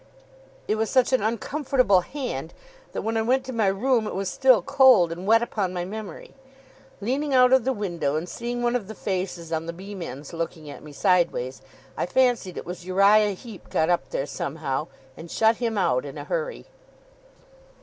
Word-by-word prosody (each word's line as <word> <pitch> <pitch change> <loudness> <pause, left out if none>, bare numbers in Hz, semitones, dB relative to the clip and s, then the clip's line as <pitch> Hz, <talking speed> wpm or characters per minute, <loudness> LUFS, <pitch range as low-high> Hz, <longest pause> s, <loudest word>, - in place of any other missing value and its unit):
It 215 - +1
was 220 0 0
such 260 -1 +3
an 260 - +3
uncomfortable 235 -2 +1
hand, 175 - -5 0.4
that, - - -4
when 225 +1 -1
I - - +2
went 255 +4 +1
to 260 - -6
my 220 -3 +1
room, 220 +3 +1
it - - -5
was 195 -1 -2
still 260 -4 +4
cold 260 -11 +5
and 175 +3 -6
wet 225 +2 +5
upon 195 -6 -2
my 175 0 -2
memory. 205 -3 -8 0.7
Leaning 270 +6 -1
out 250 0 +6
of 260 -3 +4
the 265 - +2
window, 175 - -2
and 160 +3 -2
seeing 240 +4 -4
one 240 0 +1
of 225 -6 -2
the 220 - -8
faces 180 -4 -4
on 160 +1 -2
the 170 - -4
beam 190 +2 -9
ends 140 0 -7
looking 165 -2 -5
at - - -10
me 150 - -11
sideways, 145 -6 +1 0.3
I - - -2
fancied 240 -5 +1
it - - -6
was 180 0 -7
Uriah 200 +3 +4
Heep 215 -1 -12
got 160 +2 +1
up 135 -7 0
there 135 - -2
somehow, 145 0 -3 0.3
and 165 +1 -10
shut 225 +4 +3
him 230 -3 -2
out - - +2
in - - -8
a - - -6
hurry. - - -3
205 Hz, 195 wpm, -25 LUFS, 175-245 Hz, 0.7 s, out